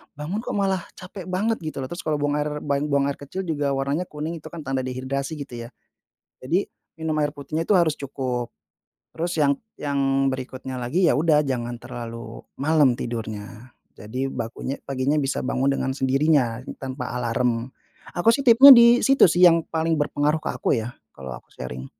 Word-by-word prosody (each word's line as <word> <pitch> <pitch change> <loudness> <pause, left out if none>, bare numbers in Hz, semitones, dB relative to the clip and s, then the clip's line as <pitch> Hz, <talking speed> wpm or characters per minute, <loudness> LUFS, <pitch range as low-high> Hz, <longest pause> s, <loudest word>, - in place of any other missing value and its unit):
bangun 155 +8 -4
kok 230 - -4
malah 195 -2 +1 0.2
capek 185 0 -9
banget 205 +5 0
gitu 155 -4 -5
loh. 130 - -6
Terus 175 - -6
kalau 155 - +1
buang 145 0 0
air, 150 0 -3
ban 140 +1 0
buang 140 -1 +1
air 140 - -5
kecil 165 +7 -5
juga 145 -5 -1
warnanya 140 +6 -1
kuning 155 +3 -5
itu - - -11
kan 165 -2 -8
tanda 135 -1 -2
dehidrasi 135 +3 -3
gitu 120 -5 -7
ya. - - -15 0.7
Jadi 170 +10 0 0.3
minum 160 -1 -3
air 145 0 -1
putihnya 155 +4 -4
itu 205 - +5
harus 165 -4 +2
cukup. 130 -3 -3 0.7
Terus 170 0 -3
yang 140 -2 +4 0.2
yang 140 -1 -2 0.3
berikutnya 130 0 -6
lagi, 160 +10 +1
ya - - +4
udah 150 -1 +3
jangan 120 -3 -3
terlalu 115 -1 -8 0.2
malam 145 -4 +3
tidurnya, 110 -1 -6 0.2
jadi 110 +7 -5
bakunya 120 +3 -5
paginya 135 +2 0
bisa 135 -1 -2
bangun 130 +1 +1
dengan 135 -1 -1
sendirinya 135 -3 +1 0.2
tanpa 130 -2 -5
alarm. 120 0 -1 0.5
Aku 225 +6 +4
sih 275 - 0
tipnya 265 +2 +10
di 235 0 +6
situ 270 -8 +6
sih 180 +2 +5
yang 170 -1 +6
paling 165 0 0
berpengaruh 145 +1 0
ke - - -4
aku - - 0
ya. 120 +2 -8 0.2
Kalo 65 -1 -9
aku - - -19
sharing. 65 +1 -7
140 Hz, 180 wpm, -23 LUFS, 130-160 Hz, 0.7 s, tipnya